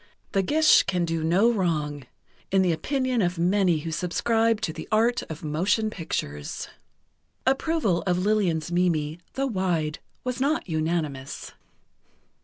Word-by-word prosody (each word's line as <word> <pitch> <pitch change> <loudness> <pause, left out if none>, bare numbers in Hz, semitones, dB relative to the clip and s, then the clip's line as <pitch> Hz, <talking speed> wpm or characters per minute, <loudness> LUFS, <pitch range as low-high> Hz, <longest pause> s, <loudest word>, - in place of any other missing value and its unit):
The 195 - +2
Gish 310 +10 +5
can 180 -2 0
do 165 -1 -2
no 190 +9 +4
wrong, 150 - -1 0.4
in 190 0 +3
the 180 - +2
opinion 255 - 0
of 180 -1 0
many 175 -2 +2
who 165 - -4
subscribe 225 +7 +1
to 160 - -2
the - - -8
art 230 +3 +3
of 160 0 -7
motion 185 +8 +1
pictures...." 75 - -4 0.8
Approval 270 - +1
of 180 -1 +2
Lillian's 180 -5 +1
Mimi, 170 -3 +1
though 270 - -1
wide, 180 - -1 0.2
was 250 0 -3
not 290 -1 +1
unanimous. 155 -4 -2
180 Hz, 135 wpm, -26 LUFS, 160-225 Hz, 0.8 s, Gish